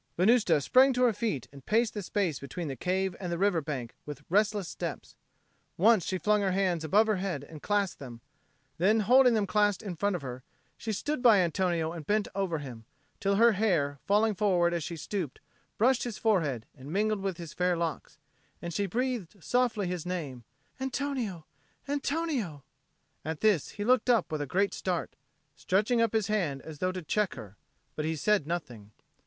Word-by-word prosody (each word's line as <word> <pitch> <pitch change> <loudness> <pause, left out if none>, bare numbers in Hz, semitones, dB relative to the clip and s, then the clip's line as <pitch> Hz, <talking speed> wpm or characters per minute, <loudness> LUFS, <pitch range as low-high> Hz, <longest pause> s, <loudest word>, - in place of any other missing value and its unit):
Venusta 190 -4 +4
sprang 260 - +5
to 250 0 +1
her 240 -3 +4
feet 210 - -2
and 140 -1 -13
paced 225 - +1
the 210 - -4
space 185 -6 -1
between 160 +4 -6
the 135 - -4
cave 185 +6 -1
and 180 -3 -4
the 170 - -1
river 190 -3 +2
bank 135 -6 -5
with 145 -1 -8
restless 205 -1 +2
steps. - - -6 0.6
Once 210 0 +5
she 185 - -2
flung 210 +2 +2
her 190 -2 +1
hands 185 -4 +1
above 205 +8 +4
her 215 -2 +1
head 180 -7 -3
and 150 0 -11
clasped 205 -3 0
them; 120 -4 -9 0.6
then, 210 +5 +4
holding 250 +3 +5
them 210 -2 +1
clasped 205 +2 +1
in 190 -4 -5
front 200 +3 0
of 175 - -5
her, 125 -1 -6 0.3
she 225 - -4
stood 290 +7 -2
by 235 -4 +7
Antonio 170 -2 +1
and 165 -4 -8
bent 210 0 +1
over 190 -4 -1
him, 125 -6 -8 0.4
till 200 0 +1
her 230 +3 +6
hair, 170 -10 +1
falling 210 +2 +3
forward 180 -4 +2
as 170 -2 -1
she 170 +3 -5
stooped, 160 -2 -4 0.4
brushed 250 +3 +3
his 235 -4 -4
forehead 155 - +1
and 140 +1 -10
mingled 210 +3 +1
with 190 -3 -2
his 170 -3 -8
fair 180 -1 +1
locks; 165 -2 -4 0.4
and 170 -1 -6
she 200 +4 0
breathed 235 -4 -2
softly 240 -5 +1
his 180 -2 -3
name, 155 -9 -5 0.4
"Antonio, 260 - -3 0.4
Antonio!" 280 - -2 0.6
At 155 0 -4
this 210 -9 +3
he 205 - -2
looked 255 +1 +3
up 230 -9 +3
with 155 -1 -2
a 145 - -3
great 195 +7 +1
start, 180 -3 -3 0.4
stretching 215 +6 +1
up 230 -2 +1
his 220 -2 +2
hand 175 -11 -1
as 155 -2 -9
though 185 0 0
to 185 -1 -6
check 210 +5 0
her; 105 -5 -10 0.4
but 155 - -2
he 160 +1 -1
said 185 0 +1
nothing. 120 -12 -5
190 Hz, 190 wpm, -29 LUFS, 160-215 Hz, 0.6 s, by